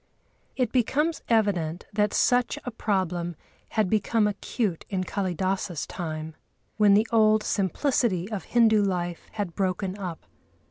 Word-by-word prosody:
It 250 -4 0
becomes 295 +6 +1
evident 190 -7 +1
that 210 0 +2
such 245 -1 +2
a 250 - -3
problem 180 -6 -1 0.3
had 215 -3 +1
become 215 +2 +2
acute 210 -2 -2
in 190 -2 -1
Kâlidâsa's 185 -2 -2
time, 160 -2 -5 0.4
when 205 -2 +6
the 215 +3 +3
old 215 -1 +4
simplicity 200 - 0
of 205 -3 -4
Hindu 225 -3 +4
life 175 -3 -2
had 205 -6 -3
broken 185 0 -1
up. 180 -4 -6
200 Hz, 130 wpm, -26 LUFS, 180-220 Hz, 0.4 s, when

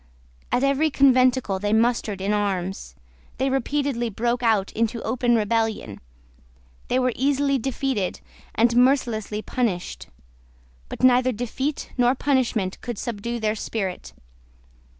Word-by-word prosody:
At 250 - +1
every 280 +3 +2
conventicle 255 -7 +3
they 205 +2 -1
mustered 220 -3 +1
in 200 +2 0
arms. 195 -2 -2 0.4
They 265 +1 0
repeatedly 270 -2 -1
broke 235 +4 -1
out 220 -5 +2
into 230 +1 -1
open 240 +1 +1
rebellion. 220 - -1 0.9
They - - +1
were 255 -1 +1
easily 275 +1 +1
defeated, 260 -6 -2 0.4
and 235 +1 +3
mercilessly 240 -5 +2
punished: 215 -9 -2 0.8
but - - -7
neither 255 0 +5
defeat 250 +5 -3
nor 245 +1 +4
punishment 245 -9 0
could 240 -3 -5
subdue 235 +2 -4
their 215 -1 0
spirit. 205 -4 -4
235 Hz, 120 wpm, -23 LUFS, 210-260 Hz, 0.9 s, neither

